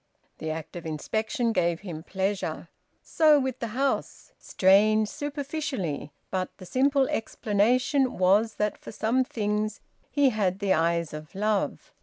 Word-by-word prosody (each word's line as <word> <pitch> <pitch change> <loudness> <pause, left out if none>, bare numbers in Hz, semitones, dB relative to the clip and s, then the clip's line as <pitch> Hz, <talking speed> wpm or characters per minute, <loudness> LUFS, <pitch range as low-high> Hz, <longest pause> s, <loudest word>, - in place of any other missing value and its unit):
The 160 - -4
act 160 +2 -5
of 175 - -6
inspection 220 - -1
gave 170 -4 +1
him 170 -6 -6
pleasure. 195 +3 -3 0.3
So 310 -2 +4
with 260 -2 -2
the 235 - -2
house. 275 0 -1
Strange, 210 +3 +4
superficially; 280 - -4 0.2
but 185 -1 -1
the 185 - -11
simple 270 +5 +2
explanation 245 +5 +1
was 200 +5 +3
that 210 0 -1
for - - -9
some 240 +4 +1
things 210 -2 -2 0.3
he 280 +1 +3
had 195 -4 0
the 200 -2 +1
eyes 170 -1 +1
of 155 +2 -9
love... 210 0 -1
210 Hz, 140 wpm, -27 LUFS, 185-255 Hz, 0.3 s, So